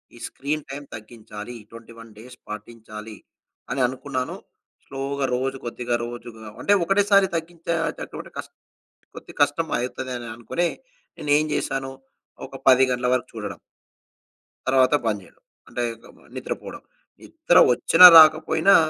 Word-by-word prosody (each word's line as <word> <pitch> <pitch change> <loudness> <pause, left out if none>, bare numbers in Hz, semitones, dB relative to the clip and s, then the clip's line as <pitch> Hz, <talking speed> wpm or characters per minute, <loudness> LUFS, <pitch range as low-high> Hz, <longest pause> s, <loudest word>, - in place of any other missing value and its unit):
ఈ - - -14
screen 150 +2 -4
time 140 +1 -7
తగ్గించాలి, 110 0 -10 0.2
21 115 -1 -13
days 125 +3 -13
పాటించాలి 110 -1 -9 0.5
అని 130 +1 -1
అనుకున్నాను. 130 0 -4 0.5
స్లోగా 135 +1 -3
రోజు 135 +1 -2
కొద్దిగా 120 0 -3
రోజుగా 120 -2 -10
అంటే, 205 - +3
ఒకటేసారి 200 +1 +3
తగ్గించేటటువంటె 165 0 -4
కస్ - - -6 0.7
కొద్దిగ - - -12
కష్టం - - 0
అయితదే 130 +1 -5
అనే 120 - -8
అనుకునే 170 +9 -2 0.5
నేనేం 150 +1 +2
జేశాను. 135 -1 -3 0.5
ఒక 135 - -11
10 130 0 +6
గంటల 125 0 -1
వరకు 125 0 -2
చూడడం... 105 -2 -6 1.1
తర్వాత 130 +1 +3
బంద్ 105 -2 -1
జెయడం, - - -22 0.3
అంటే, 120 - -4 0.2
గ - - -19
మ - - -22 0.2
నిద్రపోడం. - - -6 0.4
నిద్ర 315 - +1 0.2
ఒచ్చినా, 180 +8 +6
రాకపోయినా 160 +5 +6
130 Hz, 125 wpm, -23 LUFS, 115-150 Hz, 1.1 s, 10